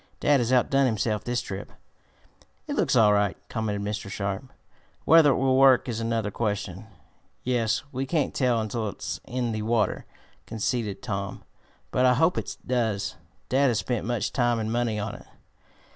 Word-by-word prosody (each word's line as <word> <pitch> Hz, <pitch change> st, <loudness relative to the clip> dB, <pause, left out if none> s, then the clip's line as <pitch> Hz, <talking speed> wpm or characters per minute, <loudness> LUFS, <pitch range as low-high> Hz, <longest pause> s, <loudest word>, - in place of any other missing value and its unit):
"Dad 145 Hz, -2 st, +4 dB
has 120 Hz, 0 st, 0 dB
outdone 135 Hz, +2 st, +3 dB
himself 110 Hz, -2 st, -1 dB
this 120 Hz, 0 st, -1 dB
trip." 100 Hz, 0 st, -7 dB, 0.9 s
"It -, -, -4 dB
looks -, -, +1 dB
all 105 Hz, -2 st, +6 dB
right," 100 Hz, -1 st, +1 dB
commented 105 Hz, -3 st, -2 dB
Mr. 105 Hz, -1 st, -4 dB
Sharp. 100 Hz, +5 st, -3 dB, 0.6 s
"Whether 160 Hz, -2 st, +7 dB
it 135 Hz, -, +3 dB
will 130 Hz, 0 st, +2 dB
work 135 Hz, -2 st, +6 dB
is 115 Hz, -2 st, -3 dB
another 115 Hz, -2 st, -1 dB
question." 105 Hz, -2 st, -3 dB, 0.6 s
"Yes, 120 Hz, -3 st, 0 dB
we 135 Hz, +1 st, -3 dB
can't 150 Hz, -2 st, 0 dB
tell 125 Hz, -4 st, +2 dB
until 110 Hz, 0 st, -2 dB
it's -, -, -5 dB
in 125 Hz, -1 st, -2 dB
the 110 Hz, -1 st, -3 dB
water," 110 Hz, -2 st, 0 dB, 0.4 s
conceded 110 Hz, -2 st, -2 dB
Tom. 100 Hz, -5 st, -4 dB, 0.5 s
"But 130 Hz, 0 st, +3 dB
I 125 Hz, -, +4 dB
hope 160 Hz, +7 st, +3 dB
it -, -, -6 dB
does. 110 Hz, -6 st, -1 dB, 0.3 s
Dad 135 Hz, +2 st, +3 dB
has 120 Hz, -4 st, +1 dB
spent 120 Hz, -3 st, -2 dB
much 120 Hz, -2 st, -2 dB
time 120 Hz, -2 st, +2 dB
and 110 Hz, 0 st, -2 dB
money 120 Hz, -2 st, 0 dB
on 105 Hz, 0 st, -3 dB
it." -, -, -12 dB
115 Hz, 170 wpm, -26 LUFS, 105-125 Hz, 0.9 s, Whether